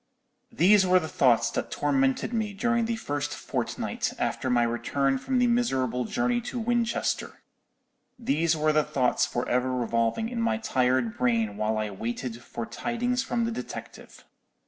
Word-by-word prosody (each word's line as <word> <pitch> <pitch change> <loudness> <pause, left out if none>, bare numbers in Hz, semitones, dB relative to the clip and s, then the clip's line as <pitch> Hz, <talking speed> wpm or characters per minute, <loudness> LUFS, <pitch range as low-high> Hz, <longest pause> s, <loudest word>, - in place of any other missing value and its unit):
"These 190 +5 +5
were 185 0 +5
the 160 - -5
thoughts 125 -6 +3
that - - -3
tormented 135 - 0
me 215 -3 -1
during 235 +2 +1
the 230 0 -1
first 145 -8 -3
fortnight - - -3
after 130 - -1
my 120 -1 +3
return 130 +4 0
from 260 - -1
the 250 - +4
miserable 130 - +1
journey 240 +2 0
to 245 +1 -6
Winchester; 235 0 -1 0.7
these 165 - +1
were 155 0 +2
the 155 0 +3
thoughts 130 -4 +1
for 120 - -3
ever 125 +1 +1
revolving 115 - 0
in 235 0 -3
my 230 -1 +1
tired 130 - +1
brain 115 -4 +1
while 110 +1 -1
I 110 -1 -2
waited 115 +3 -5
for 120 -1 -6
tidings 240 - -1
from 235 -3 -1
the 230 - -1
detective. 230 - -8
145 Hz, 160 wpm, -27 LUFS, -, 0.7 s, These